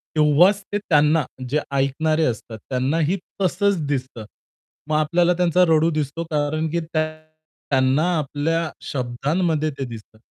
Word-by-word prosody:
तेव्हाच 155 +7 +4
ते - - +2
त्यांना 155 -5 +3 0.3
जे 150 +4 +1
ऐकणारे 155 +4 +1
असतात 115 -3 -4
त्यांनाही 150 +8 0 0.2
तसंच 195 +2 +2
दिसतं. 130 -5 -4 0.6
मग 155 - +1
आपल्याला 170 +3 +2
त्यांचा 180 0 +3
रडू 160 +1 +4
दिसतो, 155 +1 -2
कारण, 155 +1 0
की 170 - -1
त्यां 155 -1 -3 0.5
त्यांना 135 +2 +2
आपल्या 155 +3 -1 0.2
शब्दांमध्ये 150 +5 -1
ते 135 - -2
दिसतं. 110 -2 -11
155 Hz, 130 wpm, -22 LUFS, 140-165 Hz, 0.6 s, तेव्हाच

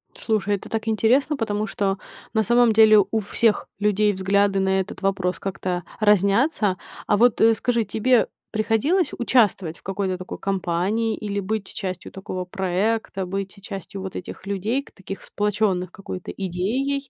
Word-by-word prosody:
Слушай, 210 -2 0
это 195 - -9
так 225 0 -3
интересно, 250 +7 +2
потому 215 -2 -1
что 195 -1 -1 0.4
на 220 -1 +3
самом 240 0 +4
деле 215 -1 +7
у 220 - +2
всех 215 +1 +1
людей 210 0 +3
взгляды 195 +1 +2
на 190 0 +2
этот 190 - -5
вопрос 190 -2 0
как-то 185 -2 -3 0.2
разнятся. 205 - +3 0.3
А 205 - +3
вот, 240 +1 +4
э, 225 0 +7
скажи, 235 +1 0
тебе 225 +4 +2 0.2
приходилось 225 - +1
участвовать 205 -9 +2
в - - -24
какой-то 190 -1 -2
такой 185 - -7
компании 195 +4 0
или 205 -1 -3
быть 200 0 -3
частью 185 -3 -5
такого 185 -1 -5
проекта? 190 +2 -1
Быть 195 +1 -4
частью 195 -1 -7
вот 190 -1 -6
этих 185 - -7
людей, 205 +7 -1
ка - - -19
таких 195 0 -8
сплочённых 205 -3 0
какой-то 185 -2 -7
идеей, 245 +10 -2
205 Hz, 155 wpm, -23 LUFS, 190-225 Hz, 0.4 s, деле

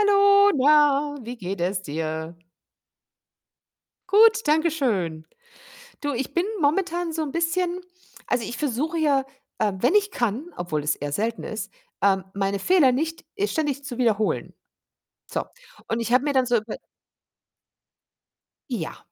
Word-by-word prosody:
Hallo, 400 0 +6
na, 290 +1 +4
wie 240 +2 -7
geht 190 -3 -5
es 185 +2 0
dir? 160 +1 -4 1.7
Gut, 445 +2 +6
danke 315 +3 +3
schön. 190 - -1 0.8
Du, 290 -2 -1
ich 255 +1 -4
bin 345 +2 +1 0.2
momentan 345 +3 0
so 320 - -2
'n 290 - -4
bisschen 345 +2 0 0.5
also, 245 -2 +1
ich 240 - -6
versuche 300 +4 -1
ja, 280 -4 +2 0.3
äh, 210 -2 +1
wenn 250 - +2
ich 410 -1 +3
kann, 245 - -2
obwohl 155 -4 -3
es 150 0 +1
eher 145 0 -5
selten 225 +9 -2
ist, 215 -2 -5 0.3
ähm, 195 -1 +3
meine 195 0 -1
Fehler 330 - +4
nicht 320 +6 -2 0.2
ständig 295 -7 -2
zu 265 -4 -6
wiederholen. 220 -4 0 0.7
So, - - -3 0.4
und 225 - -1
ich 235 +1 -2
habe 255 +2 +4
mir 290 - +1
dann 260 -2 +2
so 240 0 +3
über 215 0 -3 1.9
Ja, 180 -11 -4
260 Hz, 140 wpm, -24 LUFS, 200-320 Hz, 1.9 s, Hallo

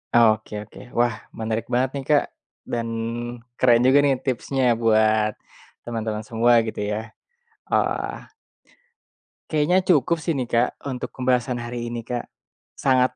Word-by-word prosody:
Ah, 120 - +7
oke 110 - -15
oke, 105 - -15 0.2
wah 120 -1 +2 0.2
menarik 110 0 -3
banget 125 +2 +1
nih - - -6
Kak 145 -1 +5 0.5
dan 115 -1 -1 0.7
keren 120 -2 +5
juga 140 +2 +6
nih 135 -2 +3
tipsnya 130 +1 -1 0.2
buat 110 -1 +3 0.5
teman-teman 110 -2 -3
semua 120 +2 +2
gitu 110 -2 -5
ya, 110 +2 -4 0.6
oh - - +5
ah. - - -3 1.2
Kayaknya 155 +4 +2
cukup 170 -3 +2
sih 160 0 -1
nih 130 - 0
Kak, 120 0 +2 0.2
untuk 125 - -4
pembahasan 125 0 +1
hari 120 0 -4
ini, 120 0 -5
Kak. 120 +1 -4 0.5
Sangat 130 -1 +2
120 Hz, 140 wpm, -23 LUFS, 115-130 Hz, 1.2 s, Ah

